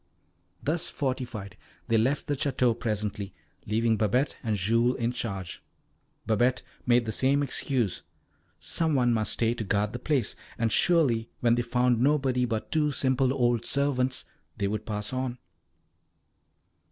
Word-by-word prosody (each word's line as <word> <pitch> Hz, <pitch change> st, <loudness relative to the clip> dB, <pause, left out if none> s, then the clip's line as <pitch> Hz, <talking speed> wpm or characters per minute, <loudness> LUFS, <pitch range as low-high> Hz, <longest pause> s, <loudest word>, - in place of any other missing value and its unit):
Thus 160 Hz, +3 st, 0 dB
fortified, 125 Hz, -7 st, -4 dB, 0.3 s
they 115 Hz, -, +2 dB
left 130 Hz, +6 st, +1 dB
the 145 Hz, -, -1 dB
Château 130 Hz, -4 st, +1 dB
presently, 105 Hz, -3 st, -3 dB, 0.3 s
leaving 110 Hz, +1 st, +2 dB
Babette 125 Hz, +7 st, +1 dB
and 110 Hz, -4 st, -1 dB
Jules 115 Hz, +6 st, +2 dB
in 115 Hz, 0 st, 0 dB
charge. 95 Hz, -7 st, -5 dB, 0.6 s
Babette 120 Hz, +4 st, +2 dB, 0.2 s
made 120 Hz, -1 st, +4 dB
the 110 Hz, -, -2 dB
same 135 Hz, +6 st, +2 dB
excuse 125 Hz, -7 st, -1 dB, 0.6 s
some 160 Hz, -3 st, 0 dB
one 120 Hz, -2 st, +3 dB
must 110 Hz, -2 st, 0 dB
stay 115 Hz, 0 st, +1 dB
to 120 Hz, -, -4 dB
guard 105 Hz, +1 st, 0 dB
the -, -, -4 dB
place, 135 Hz, -8 st, 0 dB, 0.2 s
and 115 Hz, -1 st, 0 dB
surely 130 Hz, -10 st, +3 dB
when 120 Hz, -1 st, +4 dB
they 120 Hz, -, +2 dB
found 120 Hz, 0 st, +1 dB
nobody 135 Hz, -3 st, +2 dB
but 115 Hz, -3 st, -3 dB
two 155 Hz, -2 st, +2 dB
simple 130 Hz, -1 st, +1 dB
old 120 Hz, -3 st, +1 dB
servants 130 Hz, -3 st, 0 dB, 0.3 s
they 100 Hz, -, 0 dB
would 105 Hz, +2 st, -3 dB
pass 105 Hz, +1 st, -3 dB
on. 130 Hz, -1 st, -2 dB
120 Hz, 145 wpm, -28 LUFS, 110-130 Hz, 0.6 s, made